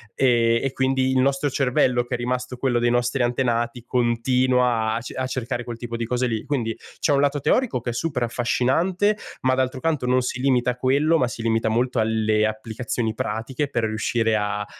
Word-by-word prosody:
ehm, 115 -3 +3
e 135 - 0
quindi 130 0 +1
il 130 - +2
nostro 140 +2 +1
cervello, 125 -2 +2
che 120 +1 -3
è - - -3
rimasto 125 +1 -3
quello 125 -2 +1
dei 120 0 +2
nostri 120 +2 +1
antenati, 120 -1 -1
continua 125 -1 +1
a 115 - -1
ce 115 - -8
a 130 0 -2
cercare 125 -1 -3
quel 120 -1 -7
tipo 120 0 -6
di 115 0 -2
cose 125 +2 0
lì. 110 -2 -2
Quindi 115 -6 -2 0.2
c'è 145 - +2
un 140 - +3
lato 145 0 +1
teorico 245 - +1
che 120 - -3
è - - -6
super 130 -1 -2
affascinante, 135 - +1 0.3
ma 130 0 +2
d'altro 130 0 -1
canto 155 -4 -1
non 130 +1 +3
si 125 0 -3
limita 125 -2 +2
a - - -6
quello, 140 +6 +2
ma 125 - +2
si 120 -1 -6
limita 115 0 +1
molto 120 +2 0
alle 110 -1 +2
applicazioni 110 +1 -3
pratiche 115 +8 -3
per 120 -4 -1
riuscire 110 +1 0
a 105 0 -1
125 Hz, 205 wpm, -23 LUFS, 115-130 Hz, 0.3 s, ehm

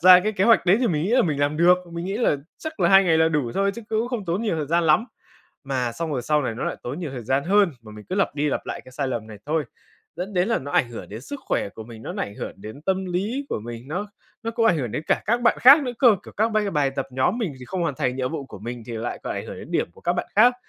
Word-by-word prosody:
ra 180 +1 +9
cái 215 +3 -1
kế 195 -1 +1
hoạch 230 -5 +5
đấy 190 +4 +6
thì 250 - +2
mình 155 -7 0
nghĩ 195 - -1
là 250 +1 +5
mình 150 -4 -1
làm 145 +1 +1
được, 175 +2 +6 0.2
mình 170 +1 -4
nghĩ 195 +2 -2
là 230 - +2 0.2
chắc 315 -10 -7
là 170 - +4
2 195 +1 +7
ngày 160 -2 +3
là 160 0 +5
đủ 150 -7 0
thôi 200 0 +2
chứ 235 - -8
cũng 225 +2 0
không 240 -6 -3
tốn 180 +5 -1
nhiều 205 -8 0
thời 150 -2 -2
gian 170 +2 +2
lắm. 155 +9 +4 0.6
Mà 125 -3 -1
xong 165 +1 -3
rồi 125 - -2
sau 150 +3 +2
này 115 - -2
nó - - -4
lại - - -2
tốn 135 +7 -5
nhiều 160 -6 -4
thời 125 -3 -6
gian 135 +3 +1
hơn 200 0 +4
mà 110 -1 -12
mình 105 0 -11
cứ 185 - -2
lặp 195 -6 +1
đi 150 0 0
lặp - - -2
lại - - -4
cái 130 - -14
sai 135 +1 -2
lầm 115 -4 -3
này 105 -2 -10
thôi. 155 0 0 0.5
Dẫn 185 +4 -4
đến 180 +4 +2
là 230 - +2
nó 145 +2 -7
ảnh 120 - +3
hưởng 115 - -8
đến 110 +3 -7
sức 285 - -7
khỏe - - 0
của 110 +2 -10
mình, 115 -1 -11
nó - - -6
ảnh 100 - -3
hưởng - - -5
đến 110 +9 -10
tâm 190 +1 0
lý 210 +11 -2
của - - -2
mình, 120 +3 -8
nó 185 +7 -3 0.4
nó 230 - -2
cũng 230 0 +1
ảnh 175 - +4
hưởng 120 -6 -3
đến 150 - -2
cả - - +1
các 240 +2 +1
bạn 235 - +3
khác 280 +4 +9
nữa 250 -2 -3
cơ, 235 -6 +6
kiểu - - -11
các 220 +2 +3
bai 210 -2 +1
bài 145 -4 +1
tập 135 0 -3
nhóm 130 - +1
mình 195 -11 -2
thì - - -8
không 180 +7 -3
hoàn 155 -5 -1
thành 125 +1 -1
nhiệm 130 +3 -2
vụ 140 -4 -4
của - - -10
mình 120 +1 -6
thì 120 - -6
lại 115 +2 -4
còn - - -2
ảnh - - -5
hưởng - - -7
đến - - -10
điểm - - 0
của - - -18
các 175 - +1
bạn 180 - -2
khác. 245 +4 +7
165 Hz, 320 wpm, -24 LUFS, 130-205 Hz, 0.6 s, ra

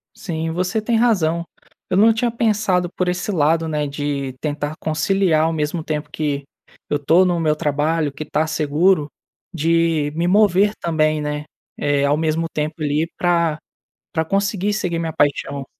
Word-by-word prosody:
Sim, 165 -4 -4
você 180 +6 -1
tem 230 +2 0
razão. 180 -8 +2 0.5
Eu 185 - +1
não 225 +3 +6
tinha 235 +2 0
pensado 210 -6 +1
por 185 - -1
esse 180 +3 -2
lado, 160 -1 +2
né, 150 -2 -1
de 140 -2 -3
tentar 150 0 -3
conciliar 160 0 +1
ao 165 - 0
mesmo 155 +1 -2
tempo 150 -1 -3
que, 145 -2 -2 0.5
eu 145 - +1
estou 160 +6 +4
no 175 -2 +1
meu 155 -2 +2
trabalho, 150 +1 0
que 145 +3 -6
está 155 +1 0
seguro 155 +1 +2 0.5
de 165 -2 +1
me 170 +2 0
mover 205 +1 +4
também, 155 -2 +1
né, 150 0 -3 0.3
eh, 145 -1 +1
ao 140 +1 +3
mesmo 160 +1 0
tempo 155 +1 -2
ali 150 +2 0
pra 170 -3 +1 0.5
pra 160 - 0
conseguir 200 +3 0
seguir 180 -5 -1
minha 165 -1 -2
paixão. 145 -2 0
160 Hz, 165 wpm, -20 LUFS, 150-180 Hz, 0.5 s, não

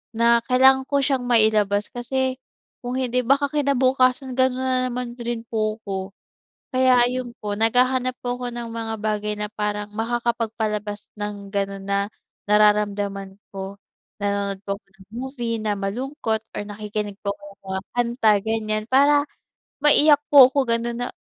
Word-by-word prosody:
na 235 +1 +4
kailangan 265 +1 +5
ko 280 -1 +2
siyang 265 -2 +1
mailabas 215 -3 +3
kasi 260 +2 -2 0.5
kung 245 +1 -3
hindi 250 0 0
baka 280 +3 +3
kinabukasan 260 -2 +2
ganun 260 0 +2
na 255 -1 +1
naman 245 -1 -4
din 235 -1 -4
po 215 -1 -1
ako. 190 -1 -5 0.6
Kaya, 255 -1 +5
ayun 250 0 -3
po, 205 -1 -3
naghahanap 250 +3 +2
po 245 0 -2
ako 245 -1 -4
ng 235 -1 -5
mga 225 -1 -4
bagay 210 0 -1
na 210 - -3
parang 210 -1 -3
makakapagpalabas 220 -2 -2
ng 205 -1 -5
gano'n 195 -1 -3
na 200 - +1 0.5
nararamdaman 205 -2 +2 0.2
ko. 195 +1 -6 0.4
Nanonood 200 -1 -1
po 200 - -1
ako - - -63
ng 190 - -16
movie 240 -2 -3
na 210 -1 0
malungkot 220 +2 -2
or - - -2
nakikinig 210 0 -5
po 200 - -1
ako - - -27
ng - - -56
mga 190 0 -3
kanta, 240 -2 +2
ganiyan, 215 -1 -1
para 285 +2 +5 0.6
maiyak 295 0 +6
po 265 -3 +10
ako, 280 - +1
ganun, 235 0 0
na - - -3
230 Hz, 155 wpm, -23 LUFS, 210-255 Hz, 0.6 s, po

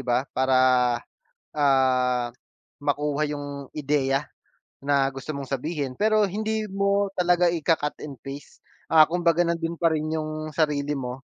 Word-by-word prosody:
ba? 125 0 0
Para, 130 0 +2 1.0
ah, 130 -4 +2 0.5
makuha 145 +1 0
yung 145 -1 -6
ideya 140 -2 0 0.6
na 140 -1 +2
gusto 135 +3 -7
mong 140 -2 -5
sabihin. 140 -1 -3
Pero 215 +4 +3
hindi 215 +2 -2
mo 200 0 0
talaga 180 -1 +3
ika-cut 165 -3 +1
and 140 -4 -8
paste, 140 +1 -9 0.3
ah, 155 -1 +7
kumbaga 170 0 +2
nandun 170 0 -2
pa 165 -2 +2
rin 155 0 -2
yung 155 0 -4
sarili 150 -2 0
mo, 125 0 -6
150 Hz, 130 wpm, -25 LUFS, 135-170 Hz, 1.0 s, ah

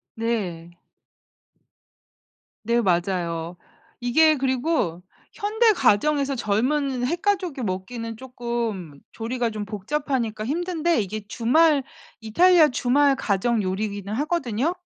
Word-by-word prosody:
네. 190 -8 -3 1.9
네. 235 +2 +2
맞아요. 175 -3 -1 0.4
이게 305 +6 +4
그리고 260 - -1 0.3
현대 440 +2 +2
가정에서 280 - +2
젊은 250 +4 0
핵가족이 350 -1 -1
먹기는 225 +3 -4
쪼끔 235 - -5
조리가 235 +1 -2
좀 215 -1 -5
복잡하니까 220 +1 -2
힘든데 340 0 0
이게 205 +1 -6
주말 280 +7 +3 0.4
이탈리아 320 +8 +5
주말 275 +2 +2
가정 225 0 0
요리기는 200 +1 -3
하거든요. 295 +1 -1
240 Hz, 240 characters per minute, -24 LUFS, 205-295 Hz, 1.9 s, 이탈리아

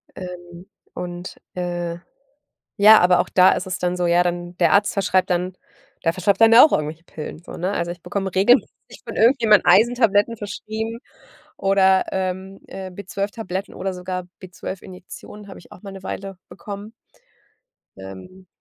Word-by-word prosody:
Ähm, 175 0 -10 0.3
und, 175 +1 -7 0.2
äh, 175 -1 -3 0.8
ja, 215 +2 +8
aber 180 0 +4
auch - - 0
da 185 0 +5
ist - - -4
es 185 - -4
dann 180 0 -1
so, 175 -1 0
ja, 175 +1 +4
dann 175 0 -4
der 170 - +3
Arzt 205 +1 +3
verschreibt 190 -2 +1
dann 180 +1 -1 0.5
der 165 - +4
verschreibt 195 +4 0
dann 225 0 +7
ja 230 - +9
auch - - -1
irgendwelche 155 +3 -2
Pillen, 155 0 -8
so - - -11
ne, 185 +3 -2
also 170 -3 -2
ich 175 -1 -10
bekomme 195 -2 -4
regelmäßig 240 +7 +1
von - - -6
irgendjemand 225 -3 +4
Eisentabletten 225 +2 +4
verschrieben 220 +3 -5 0.6
oder, 190 -1 +3
ähm, 190 +1 -4
äh, 190 -1 -7
B12-Tabletten 200 +1 -5
oder 190 0 -4
sogar 180 0 -5 0.2
B12-Injektionen 185 +2 -10
habe - - -10
ich - - -19
auch - - -16
mal 200 -2 -9
'ne 195 -1 -11
Weile 195 -1 -6
bekommen 205 +2 -9 1.1
ähm, 95 - -12
185 Hz, 160 wpm, -21 LUFS, 175-200 Hz, 1.1 s, ja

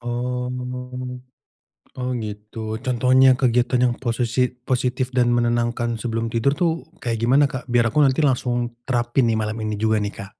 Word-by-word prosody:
Oh. 125 +1 -3 1.5
Oh, 125 0 -2
gitu. 110 +1 -6
Contohnya 130 +1 +5
kegiatan 125 0 +2
yang 120 - -1
posesi 120 +1 0
positif 125 0 -2
dan 125 -2 +2
menenangkan 120 -1 0
sebelum 115 0 -2
tidur, 120 +5 +1
tuh, 165 +1 -1 0.2
kayak 115 -3 -1
gimana, 130 +6 +4
Kak? 130 -1 -6
Biar 120 -2 +2
aku 150 +3 +4
nanti 135 +3 +2
langsung 120 -3 0
terapin, 120 0 +1
nih, 115 - +2
malam 110 0 -2
ini 110 - -2
juga 110 +1 +1
nih, 105 0 -2
Kak. 100 +1 -11
120 Hz, 155 wpm, -22 LUFS, 115-125 Hz, 1.5 s, Contohnya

